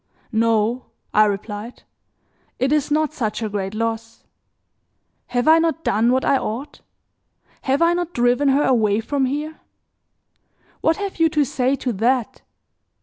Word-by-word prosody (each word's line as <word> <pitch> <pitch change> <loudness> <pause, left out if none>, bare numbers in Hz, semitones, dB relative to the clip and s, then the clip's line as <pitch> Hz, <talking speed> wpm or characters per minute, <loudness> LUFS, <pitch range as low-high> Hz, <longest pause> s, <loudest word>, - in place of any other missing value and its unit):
"No," 230 +1 +1 0.3
I 215 +1 +6
replied, 210 +3 -5 0.7
"it 260 +2 0
is 300 -2 +1
not 305 0 +1
such 230 -5 -3
a 215 - -2
great 200 0 -4
loss. 225 0 -4 1.0
Have 245 +2 -1
I 320 +1 +7
not 325 0 -1
done 225 +4 +2
what 260 +1 +1
I 275 - +3
ought? 245 +7 -6 0.8
Have 270 +4 +1
I 340 +1 +4
not 350 -1 -2
driven 245 +1 +2
her 275 +2 +3
away 215 -5 +2
from 270 +4 -1
here? 300 +4 -4 1.2
What 320 - +2
have 400 -3 -5
you 325 0 +4
to 300 -2 +1
say 255 +1 0
to 255 -3 -3
that? 235 +3 0
250 Hz, 145 wpm, -21 LUFS, 225-295 Hz, 1.2 s, I